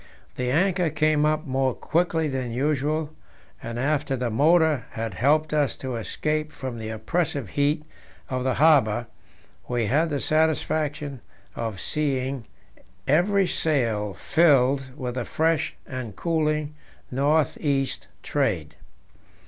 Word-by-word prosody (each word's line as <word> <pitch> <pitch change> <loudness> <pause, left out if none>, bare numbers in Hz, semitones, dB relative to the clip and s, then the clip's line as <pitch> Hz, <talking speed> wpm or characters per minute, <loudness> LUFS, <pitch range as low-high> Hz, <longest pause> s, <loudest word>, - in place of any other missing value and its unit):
The 125 0 -2
anchor 180 +4 +2
came 155 0 +2
up 155 0 0
more 130 -1 0
quickly 165 -1 0
than 130 -4 -3
usual, 150 +4 0 0.5
and 115 0 -5
after 145 +1 0
the 125 -2 -2
motor 155 0 +3
had 115 -2 -3
helped 150 +9 +2
us 145 -5 +1
to 130 -2 -5
escape 155 +7 -2
from 130 -4 -6
the 110 0 -5
oppressive 130 - -2
heat 150 +2 0 0.4
of 130 -1 -2
the 130 -2 +1
harbour, 125 -7 +4 0.6
we 120 -2 0
had 150 +9 +2
the 145 -2 -1
satisfaction 155 -3 0 0.3
of 110 -5 -4
seeing 135 -3 -2 0.6
every 190 +7 +3
sail 115 - 0
filled 140 -4 +3
with 125 -4 -3
the 125 -1 -2
fresh 160 +4 0
and 125 -6 -6
cooling 155 -2 0 0.4
north 145 +3 +2
east 135 - -1 0.2
trade. 95 - -1
140 Hz, 125 wpm, -25 LUFS, 125-155 Hz, 0.6 s, harbour